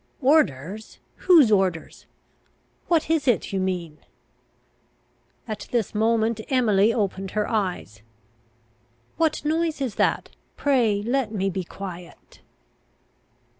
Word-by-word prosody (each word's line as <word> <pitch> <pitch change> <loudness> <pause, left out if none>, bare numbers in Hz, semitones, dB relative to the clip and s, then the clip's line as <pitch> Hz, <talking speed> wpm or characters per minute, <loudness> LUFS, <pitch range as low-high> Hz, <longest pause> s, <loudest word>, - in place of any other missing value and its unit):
"Orders? 215 - +1 0.3
Whose 315 -11 +7
orders? 190 -5 -1 0.8
What 330 -3 +2
is 320 -4 0
it 240 -4 +1
you 195 - 0
mean?" 175 -5 -3 1.5
At 215 -2 -6
this 235 -5 -1
moment 220 +1 +1
Emily 225 -5 +3
opened 195 -4 -2
her 210 - +1
eyes. 180 - -3 1.2
"What 315 -2 0
noise 320 0 0
is 260 -6 -2
that? - - 0 0.2
Pray 235 -8 +1
let 240 -1 -1
me 195 -2 -1
be 185 +1 -3
quiet." 180 -1 -10
215 Hz, 105 wpm, -24 LUFS, 190-265 Hz, 1.5 s, Whose